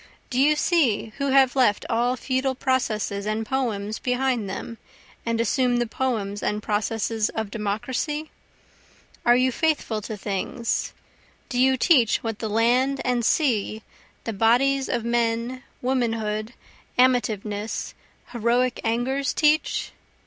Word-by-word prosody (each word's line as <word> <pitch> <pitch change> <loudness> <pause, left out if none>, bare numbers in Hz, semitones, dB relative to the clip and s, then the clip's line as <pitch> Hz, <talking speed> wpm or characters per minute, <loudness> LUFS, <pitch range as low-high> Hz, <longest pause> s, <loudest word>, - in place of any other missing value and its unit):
Do 250 - 0
you 295 +3 +5
see 275 - +1
who 280 - 0
have 265 -1 +4
left 245 -6 +3
all 240 +2 +1
feudal 260 +1 -1
processes 215 -6 -1
and 215 +1 -1
poems 220 -5 -2
behind 250 -4 0
them, 225 +3 -6 0.5
and 230 0 0
assumed 245 +1 +2
the 240 - +1
poems 220 -5 -2
and 210 0 -2
processes 220 +1 0
of 220 -2 -4
Democracy? 255 +9 -3 1.0
Are 240 - +7
you 255 +1 +3
faithful 290 -7 0
to 215 +1 -6
things? 210 +4 -2 0.6
do 245 - -2
you 260 +1 +4
teach 250 -6 +3
what 225 -2 -3
the 220 - -3
land 245 +5 +2
and 245 -1 +1
sea, 220 -6 +1 0.4
the 225 - -3
bodies 255 +6 +2
of 230 - -1
men, 235 +1 0 0.2
womanhood, 225 -3 -1 0.4
amativeness, 220 -4 0 0.4
heroic 245 +2 +1
angers, 250 +5 0
teach? 305 +1 +2
240 Hz, 125 wpm, -24 LUFS, 220-260 Hz, 1.0 s, Are